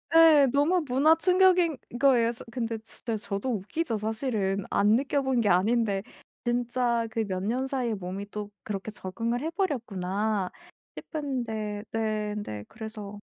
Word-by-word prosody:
예. 315 Hz, -4 st, +8 dB
너무 315 Hz, +6 st, +3 dB
문화 285 Hz, +6 st, +5 dB
충격인 360 Hz, -3 st, +4 dB, 0.2 s
거예요. 245 Hz, -4 st, +4 dB
사 235 Hz, -, -9 dB
근데 230 Hz, -2 st, -2 dB
진짜 225 Hz, +1 st, -5 dB
저도 210 Hz, +2 st, -3 dB
웃기죠 225 Hz, -, -2 dB
사실은. 215 Hz, -3 st, -1 dB
안 210 Hz, +2 st, +4 dB
느껴 280 Hz, +2 st, +1 dB
본 265 Hz, -2 st, +1 dB
게 210 Hz, -, +2 dB
아닌데 200 Hz, +1 st, +2 dB, 0.4 s
진짜 240 Hz, -1 st, 0 dB
그 225 Hz, 0 st, 0 dB
몇 185 Hz, -2 st, -3 dB
년 255 Hz, +5 st, 0 dB
사이에 250 Hz, -4 st, -1 dB
몸이 195 Hz, +1 st, -5 dB
또 210 Hz, -1 st, -5 dB
그렇게 210 Hz, 0 st, -4 dB
적응을 230 Hz, +6 st, -3 dB
해 320 Hz, -, -1 dB
버렸구나 210 Hz, -, -1 dB, 0.5 s
싶은데 225 Hz, -8 st, -3 dB
네 215 Hz, -2 st, -1 dB
근데 105 Hz, -, -5 dB
그래서 215 Hz, -2 st, -8 dB
225 Hz, 285 characters per minute, -28 LUFS, 205-265 Hz, 0.5 s, 예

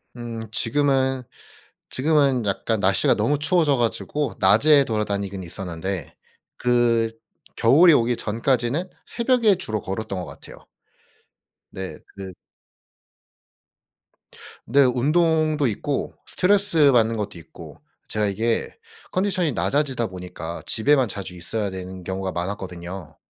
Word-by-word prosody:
음. 115 Hz, -2 st, -6 dB
지금은 130 Hz, +1 st, +1 dB, 0.7 s
지금은 140 Hz, -4 st, +2 dB
약간 100 Hz, +2 st, -1 dB
날씨가 95 Hz, -1 st, +3 dB
너무 140 Hz, +8 st, 0 dB
추워져 150 Hz, -2 st, +3 dB
가지고 120 Hz, +3 st, -1 dB
낮에 140 Hz, +9 st, +5 dB
돌아다니긴 100 Hz, -4 st, -3 dB
있었는데 90 Hz, -1 st, -5 dB, 0.4 s
그 120 Hz, -2 st, +2 dB, 0.5 s
겨울이 155 Hz, +9 st, +6 dB
오기 120 Hz, -1 st, +2 dB
전까지는 125 Hz, -, -1 dB, 0.2 s
새벽에 235 Hz, -4 st, +2 dB
주로 110 Hz, -, -3 dB
걸었던 95 Hz, 0 st, -4 dB
것 90 Hz, -, -6 dB
같아요. -, -, -12 dB, 1.1 s
네. 95 Hz, -1 st, -7 dB, 0.2 s
그 95 Hz, -2 st, -8 dB, 2.3 s
근데 140 Hz, +4 st, +4 dB
운동도 155 Hz, +3 st, +2 dB
있고 135 Hz, +6 st, -3 dB
스트레스 180 Hz, -7 st, +3 dB
받는 115 Hz, -2 st, +2 dB
것도 100 Hz, -4 st, -4 dB
있고 80 Hz, -, -13 dB, 0.3 s
제가 105 Hz, -1 st, 0 dB
이게 115 Hz, +4 st, -1 dB, 0.4 s
컨디션이 185 Hz, -4 st, +1 dB
낮아지다 135 Hz, -3 st, 0 dB
보니까 90 Hz, -2 st, -7 dB
집에만 130 Hz, +2 st, +3 dB
자주 95 Hz, -2 st, -5 dB
있어야 100 Hz, +4 st, -3 dB
되는 95 Hz, 0 st, -8 dB
경우가 95 Hz, 0 st, -3 dB
많았거든요. 90 Hz, -3 st, -6 dB
115 Hz, 270 characters per minute, -23 LUFS, 95-145 Hz, 2.3 s, 겨울이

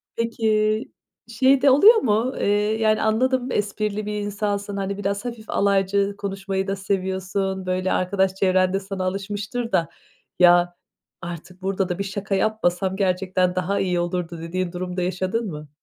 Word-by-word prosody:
Peki, 220 Hz, 0 st, +1 dB, 0.4 s
şey 260 Hz, +3 st, +3 dB
de 280 Hz, -, +6 dB
oluyor 390 Hz, -, +8 dB
mu, 240 Hz, -, +1 dB
eee, -, -, 0 dB, 0.3 s
yani, 215 Hz, 0 st, +3 dB
anladım, 250 Hz, +3 st, +1 dB
esprili 210 Hz, 0 st, -2 dB
bir 210 Hz, 0 st, -3 dB
insansın, 205 Hz, -1 st, -3 dB
hani 195 Hz, 0 st, -3 dB
biraz 200 Hz, +2 st, -2 dB
hafif 235 Hz, -3 st, -7 dB
alaycı 200 Hz, 0 st, +1 dB
konuşmayı 195 Hz, -1 st, -3 dB
da 195 Hz, -, -1 dB
seviyorsun, 190 Hz, 0 st, -2 dB
böyle 185 Hz, 0 st, -1 dB
arkadaş 190 Hz, +1 st, +1 dB
çevrende 185 Hz, 0 st, +2 dB
sana 195 Hz, -1 st, -5 dB
alışmıştır 200 Hz, +5 st, -3 dB
da 165 Hz, -1 st, +1 dB, 0.5 s
"Ya, 175 Hz, 0 st, +5 dB, 0.5 s
artık 175 Hz, +1 st, -8 dB
burada 195 Hz, 0 st, -1 dB
da 180 Hz, -, -3 dB
bir -, -, 0 dB
şaka 195 Hz, 0 st, -3 dB
yapmasam 190 Hz, -3 st, 0 dB
gerçekten 185 Hz, -1 st, 0 dB
daha 185 Hz, +2 st, 0 dB
iyi 180 Hz, -2 st, 0 dB
olurdu." 175 Hz, -1 st, -3 dB
dediğin 175 Hz, +2 st, -3 dB
durum 180 Hz, 0 st, -5 dB
da -, -, 0 dB
yaşadın 185 Hz, +5 st, -1 dB
mı? 150 Hz, -1 st, -8 dB
195 Hz, 150 wpm, -23 LUFS, 185-210 Hz, 0.5 s, oluyor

